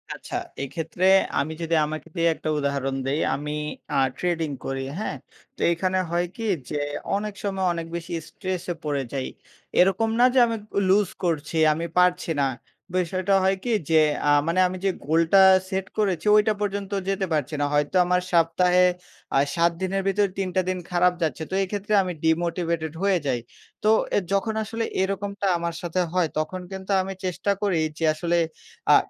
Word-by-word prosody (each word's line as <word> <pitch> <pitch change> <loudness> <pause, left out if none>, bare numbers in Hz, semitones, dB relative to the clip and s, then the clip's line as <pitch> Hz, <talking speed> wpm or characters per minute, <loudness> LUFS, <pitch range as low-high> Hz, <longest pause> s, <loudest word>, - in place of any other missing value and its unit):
আচ্ছা। - - -8 0.3
এইক্ষেত্রে 160 +5 -3 0.3
আমি 150 +3 -1
যদি 165 0 0
আমাকে 155 +2 -6
দিয়ে 170 -1 +2
একটা 155 - -4
উদাহরণ 140 -1 -1
দেই 140 +3 0 0.2
আমি 150 +2 -4 0.4
আ - - +3 0.2
ট্রেডিং 170 -3 -1 0.2
করি 135 0 -3 0.2
হ্যাঁ? 215 - -3 0.4
তো - - -10
এখানে 185 +2 0
হয় 175 +1 +1
কি? 225 - -5 0.2
যে 150 - -2 0.4
অনেক 210 +1 -3
সময় 195 -2 -1
অনেক 165 -1 -4
বেশি 170 0 -5 0.2
স্ট্রেসে 185 -2 -4
পড়ে 145 -3 -1
যাই। 135 -2 -2 0.5
এরকম 195 +5 +4
না 245 - +7
যে 260 - +5
আমি 230 - -1 0.2
ক - - -25 0.2
লুস 200 -1 +4
করছি, 165 -2 -1 0.2
আমি 165 +2 -3
পারছি 180 -1 +3
না, 135 - +3 0.5
বিষয়টা 185 +2 0
হয় 190 +1 +3
কি? 245 - -1 0.2
যে 160 -1 +6 0.3
আ - - +5 0.2
মানে 170 +3 +1
আমি 185 +1 -5
যে 195 - +3 0.2
গোলটা 165 +5 +4 0.3
সেট 190 0 -2
করেছি 190 -6 0
ঐটা 210 +1 +4
পর্যন্ত 200 -1 -2 0.2
যেতে 195 0 0
পারছি 150 -1 -1
না। - - +2
হয়তো 145 +4 +1
আমার 180 +1 +2
সপ্তাহে 180 +2 +4 0.5
আ - - +6 0.2
৭ 170 0 +3
দিনের 190 +1 0
ভেতরে 200 +1 +2
৩ 190 -1 -1
টা 185 - +4
দিন 185 - -1
খারাপ 180 0 +3
যাচ্ছে। 160 -1 -1
তো - - -7
এই - - -3
ক্ষেত্রে 205 +1 -2
আমি 180 -1 -3
ডিমোটিভেটেড 165 -1 0
হয়ে 195 -2 +3
যাই। 125 -3 +1 0.4
তো 215 - +4 0.3
এ - - +5
যখন 210 +3 +1
আসলে 225 +1 -3 0.2
এরকমটা 200 +1 -2
আমার 170 0 -3
সাথে 175 +1 -2
হয়, 180 -2 +2
তখন 180 +4 -3
কিন্তু 190 +1 -6
আমি 190 +1 -4
চেষ্টা 185 +2 -1
করি 195 -5 +1 0.2
যে 165 - 0
আসলে 170 +2 0 0.6
আ - - +9
180 Hz, 180 wpm, -24 LUFS, 160-195 Hz, 0.6 s, আ